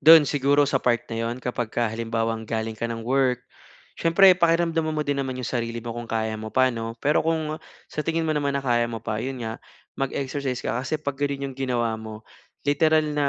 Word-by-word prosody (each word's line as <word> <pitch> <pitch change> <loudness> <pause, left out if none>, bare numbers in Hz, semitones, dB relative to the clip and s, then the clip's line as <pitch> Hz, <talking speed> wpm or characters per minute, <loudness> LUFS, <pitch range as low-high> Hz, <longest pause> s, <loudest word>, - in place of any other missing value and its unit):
doon 160 -1 +9
siguro 145 +1 +3
sa 135 -2 +1
part 120 -1 +1
na 115 - -2
iyon 115 +1 -2
kapagka 120 -1 -1
halimbawang 115 -1 -2
galing 110 -1 -2
ka 115 +2 -3
ng 115 -1 -5
work. 125 -1 +1 0.6
Siyempre 185 +3 +7
pakiramdaman 165 -2 +2
mo 150 - 0
din 140 -1 0
naman 130 -1 -3
iyong 125 - -4
sarili 115 0 -2
mo 115 - -4
kung 120 0 -7
kaya 110 -1 -1
mo 110 - -5
pa 130 +2 +3
'no. 115 0 -5
Pero 150 - +4
kung 160 -1 -1 0.3
sa - - -4
tingin 165 0 0
mo 155 - +1
naman 140 -2 0
na 140 - -3
kaya 120 -2 +2
mo 115 -1 -6
pa, 110 0 -2
iyon 130 -2 -4
nga, 110 0 -3 0.5
mag-exercise 135 -1 -2
ka. - - 0
Kasi 145 +4 -1
'pag 140 -3 -3
ganoon 140 -1 -1
iyong 130 - -17
ginawa 120 -4 0
mo, 110 0 -9 0.4
literal 155 +2 +3
na, 145 -1 +1
130 Hz, 210 wpm, -25 LUFS, 115-145 Hz, 0.6 s, doon